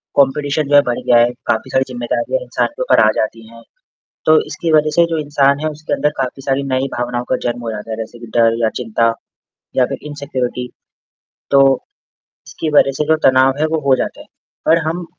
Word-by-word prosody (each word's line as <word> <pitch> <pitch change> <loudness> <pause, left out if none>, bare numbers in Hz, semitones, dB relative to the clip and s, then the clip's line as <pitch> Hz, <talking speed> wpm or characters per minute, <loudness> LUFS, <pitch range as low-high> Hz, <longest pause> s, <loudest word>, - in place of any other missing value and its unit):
competition 140 +2 +1
जो 145 - +4
है 145 - +8
बड़ 120 - -3
गया 120 -1 +3
है, 120 +1 +4 0.2
काफ़ी 110 - 0
सारी 130 0 +2
ज़िम्मेदारियाँ 125 - -2
इंसान - - -1
के - - -5
ऊपर - - +4
जाती 110 +1 -3
हैं, 115 0 -14 0.6
तो 155 0 +6
इसकी 165 -2 -3
वजह 155 0 +4
से 170 0 +5
जो - - 0
इंसान 145 -1 +2
है 155 0 -1
उसके 155 +1 -5
अंदर 150 - +1
काफ़ी 130 +1 -3
सारी 135 0 -1
नई 130 +1 0
भावनाओं 120 0 -2
का 130 - +2
जन्म 120 0 -3
हो 115 -1 -4
जाता 110 +1 -7
है 110 - -3
जैसे 115 +1 -7
कि 120 - -9
डर 115 0 +4
या 110 - +3
चिंता 115 0 +1 0.6
या - - +4
फिर - - -5
इनसेक्यूरिटी 130 -4 -4 0.8
तो 140 - +6 0.9
इसकी 155 0 -5
वजह 135 - +5
से 150 - +1
जो 160 0 +3
तनाव 130 0 +5
है 155 - +3
वो - - +2
हो 135 - +5
जाता - - -4
है, - - -13 0.4
पर 165 - +5
हम 170 +2 -2
135 Hz, 210 wpm, -17 LUFS, 120-150 Hz, 0.9 s, है